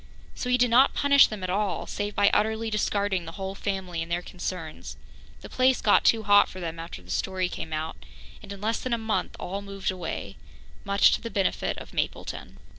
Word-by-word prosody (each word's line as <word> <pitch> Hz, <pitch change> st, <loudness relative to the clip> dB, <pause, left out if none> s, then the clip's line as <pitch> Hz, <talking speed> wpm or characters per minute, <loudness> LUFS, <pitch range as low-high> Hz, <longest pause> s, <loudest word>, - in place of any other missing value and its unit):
So 250 Hz, -, -4 dB
he 250 Hz, -, +4 dB
did 245 Hz, -1 st, +3 dB
not 260 Hz, +4 st, +5 dB
punish 280 Hz, -1 st, +6 dB
them 210 Hz, -3 st, -7 dB
at 185 Hz, -, -2 dB
all, 200 Hz, 0 st, -1 dB
save 205 Hz, 0 st, -4 dB
by 200 Hz, 0 st, +4 dB
utterly 220 Hz, +1 st, +1 dB
discarding 200 Hz, -3 st, 0 dB
the 165 Hz, -, -8 dB
whole 190 Hz, +1 st, -5 dB
family 190 Hz, -4 st, -3 dB
and 165 Hz, +1 st, -6 dB
their 175 Hz, +1 st, -1 dB
concerns. 175 Hz, -3 st, -6 dB, 0.4 s
The -, -, -9 dB
place 255 Hz, 0 st, +3 dB
got 205 Hz, -, +4 dB
too 225 Hz, -1 st, +4 dB
hot 205 Hz, 0 st, +5 dB
for 185 Hz, -, -9 dB
them 165 Hz, -2 st, -5 dB
after 165 Hz, -, -8 dB
the 90 Hz, -, -10 dB
story 185 Hz, -, -1 dB
came 160 Hz, -2 st, -6 dB
out, 155 Hz, +1 st, -4 dB, 0.4 s
and -, -, -11 dB
in 200 Hz, -1 st, -8 dB
less 225 Hz, +2 st, 0 dB
than 255 Hz, -, -2 dB
a -, -, +2 dB
month 220 Hz, -5 st, -2 dB
all 195 Hz, +3 st, -4 dB
moved 195 Hz, -1 st, -3 dB
away 180 Hz, -3 st, -5 dB, 0.5 s
much 200 Hz, 0 st, +5 dB
to -, -, 0 dB
the 230 Hz, -, -5 dB
benefit 195 Hz, -4 st, -1 dB
of -, -, -10 dB
Mapleton. -, -, -4 dB
200 Hz, 210 wpm, -26 LUFS, 180-220 Hz, 0.5 s, punish